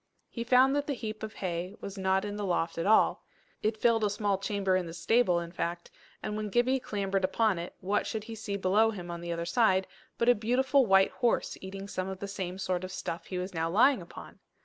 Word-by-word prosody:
He 235 - -4
found 255 +3 +5
that 290 0 -1
the 285 - -1
heap 215 -3 -6
of 220 -1 -5
hay 180 0 -4
was 200 - -7
not 190 0 +1
in 205 0 -4
the 210 - -4
loft 175 -3 -1
at 165 - -1
all. 220 - +4 0.4
It 215 +1 0
filled 225 0 +3
a 210 - +3
small 205 -1 0
chamber 195 -2 0
in 185 -2 0
the 165 - -8
stable, 185 -1 +3
in 170 0 -6
fact; 170 0 -4 0.3
and 210 - -3
when 215 0 -3
Gibbie 245 +5 +2
clambered 195 -4 -2
upon 195 0 +2
it, 170 - -7
what 200 +3 0
should 220 -2 -3
he 225 - -8
see 205 -2 -4
below 200 +4 +3
him 180 -5 -6
on 170 0 -6
the 170 0 -4
other 170 0 -2
side, 190 -1 +3 0.3
but 235 - 0
a 245 - +8
beautiful 255 +4 +2
white 195 0 +5
horse, 240 -2 0
eating 195 +1 -7
some 185 -2 -3
of 190 - -5
the 200 - -5
same 185 -2 -4
sort 185 -1 -2
of 185 - -5
stuff 170 - -5
he 185 - -4
was 185 +1 -4
now 165 0 -1
lying 245 +6 +4
upon! 170 - -11
200 Hz, 240 wpm, -30 LUFS, 185-225 Hz, 0.4 s, a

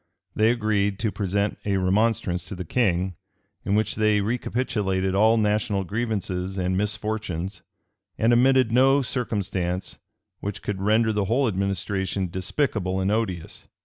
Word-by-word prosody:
They 110 +1 +4
agreed 105 -4 +1
to 110 0 -1
present 100 +1 -1
a 100 -2 0
remonstrance 95 -2 +1
to 100 - -7
the 90 0 -6
king, 95 -4 0 0.5
in 100 - 0
which 110 +1 +1
they 110 -1 +2
recapitulated 100 -4 -1
all 110 +3 +4
national 105 -1 +1
grievances 95 -3 -3
and 90 0 0
misfortunes, 105 -3 -2 0.6
and 115 +2 +3
omitted 130 -1 +4
no 135 +3 +4
circumstance 100 -7 -3 0.4
which 100 +1 -5
could 100 -2 -3
render 110 +2 +3
the 105 -1 0
whole 125 +6 +2
administration 95 -1 -1
despicable 95 - -1
and 95 +1 +1
odious. 105 -7 -3
105 Hz, 135 wpm, -25 LUFS, 95-110 Hz, 0.6 s, They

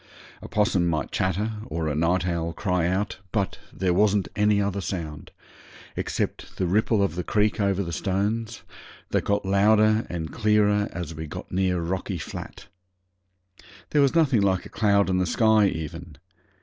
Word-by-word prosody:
A - - -8
'possum 105 -4 +1
might 80 -2 -1
chatter 95 +4 0 0.2
or 80 0 -3
a 75 - 0
night 85 +4 +1
owl 85 -2 -2
cry 90 -3 0
out, 95 +1 -1
but 100 -3 -1
there 90 -1 0
wasn't 100 0 +2
any 105 0 +3
other 100 -1 -1
sound, 80 -6 -5 0.7
except - - -3
the 95 - 0
ripple 105 +3 +2
of 100 - 0
the 90 +1 -3
creek 105 +3 +1
over 100 -1 +1
the 85 - -5
stones, 105 +5 -2 0.5
that - - +1
got 100 -1 0
louder 110 +3 +3
and 80 -3 -5
clearer 105 -2 +2
as 85 -2 -5
we 80 0 -6
got - - -8
nearer 90 -2 0
Rocky 95 +2 -3
Flat. 75 - -8 1.3
There 150 - +4
was 140 +1 +3
nothing 140 -9 +4
like 95 -2 +1
a - - -9
cloud 100 -2 +2
in 95 -1 +1
the 90 - +1
sky 110 +1 +4
even. 80 -2 -6
95 Hz, 165 wpm, -25 LUFS, 85-105 Hz, 1.3 s, There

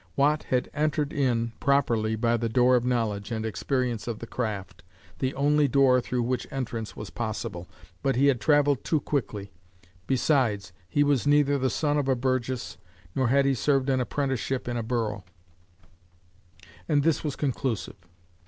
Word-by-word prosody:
Watt 150 +2 +2
had 125 -1 0
entered 150 -1 0
in 120 -5 +1
properly 115 -6 +2
by 115 +1 +1
the 115 0 -1
door 125 +2 +4
of 120 - +2
knowledge 115 -5 -1
and 110 -1 -2
experience 120 +1 -2
of 115 -2 -3
the 115 - -7
craft, 110 -5 -4 0.4
the 130 -1 0
only 145 +1 +3
door 130 -1 +4
through 125 0 -2
which 125 0 -2
entrance 115 -4 -4
was 105 - -8
possible, 105 -6 -4 0.3
but 135 -1 +1
he 135 +3 +3
had 135 -5 +3
travelled 145 +1 +3
too 155 - +1
quickly; 105 -9 -3 0.6
besides 120 - +1 0.2
he 145 - +3
was 145 -2 +1
"neither 145 -1 +4
the 130 0 +1
son 145 +3 0
of 140 - -1
a 135 - +3
burgess, 130 0 -2 0.3
nor 130 -2 +1
had 140 +3 +3
he 135 - +3
served 135 +1 +1
an 130 -1 +2
apprenticeship 130 -1 -2
in 120 - -2
the 120 - -1
borough," 110 -3 -2 1.7
and 145 -2 +3
this 165 -1 +1
was 150 -3 -2
conclusive. 115 - -3
130 Hz, 165 wpm, -27 LUFS, 115-140 Hz, 1.7 s, door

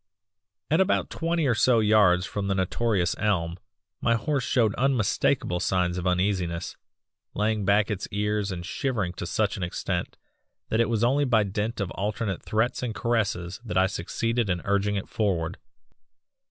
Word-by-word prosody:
"At 160 +4 +4
about 190 - +1
twenty 165 -1 0
or 125 - +3
so 120 +1 +4
yards 105 -5 +4
from 100 -1 -3
the 95 - +1
notorious 95 -1 0
elm 85 -4 0 0.4
my 115 - +3
horse 140 +3 -1
showed 115 -3 +2
unmistakable 120 -8 +1
signs 90 -1 +1
of 90 - -2
uneasiness, 90 -2 0 0.6
laying 105 -1 0
back 100 +2 +3
its 100 -2 -3
ears 105 0 -1
and 85 -2 -5
shivering 105 - -2
to 90 - -5
such 105 +3 0
an - - -6
extent 85 - -3 0.5
that 110 - +1
it 115 - +1
was 115 -1 0
only 140 +4 +3
by 115 -5 +3
dint 105 +4 -3
of 100 -3 -2
alternate 100 -1 -2
threats 110 +3 0
and 120 -4 -3
caresses 100 -5 -1
that 105 -7 -3
I 95 - +5
succeeded 115 +5 -1
in 90 -2 -1
urging 100 +1 +1
it 100 - -3
forward. 90 -7 -1
105 Hz, 165 wpm, -26 LUFS, 95-115 Hz, 0.6 s, I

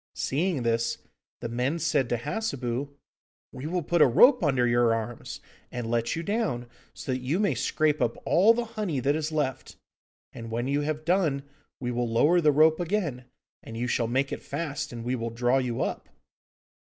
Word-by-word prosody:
Seeing 155 -1 -1
this, 115 0 0 0.4
the - - -3
men 125 +7 -1
said 145 -6 +1
to 120 - +1
Hassebu, 135 - -3 0.6
'We 130 - -8
will 175 +1 -1
put 170 +2 +1
a - - +8
rope 245 - +6
under 135 -5 +2
your 120 -1 +3
arms, 115 +1 -5 0.3
and 120 -2 -4
let 115 0 0
you 165 - -3
down, 200 - -1 0.3
so - - -6
that 130 0 -2
you 140 +9 -1
may 200 -7 +2
scrape 150 +4 0
up 120 -2 0
all 210 +6 +5
the 240 0 -1
honey 210 - -3
that 140 +3 +1
is 155 0 -2
left, 145 -5 -2 0.6
and 115 -1 -8
when 120 +3 -2
you 140 +1 +1
have 155 +1 -3
done 165 -6 +1 0.4
we 125 -2 -3
will 120 -1 -1
lower 150 +10 +4
the 150 -2 +5
rope 155 +3 +4
again, 170 -9 -2 0.4
and 115 - -9
you 120 - -1
shall 120 -1 0
make 135 +4 0
it - - -4
fast, 150 -1 -4
and 120 -1 -7
we 125 +2 -1
will 115 -1 -3
draw 120 +3 +1
you 125 -3 -1
up. - - -4
135 Hz, 190 wpm, -27 LUFS, 120-160 Hz, 0.6 s, a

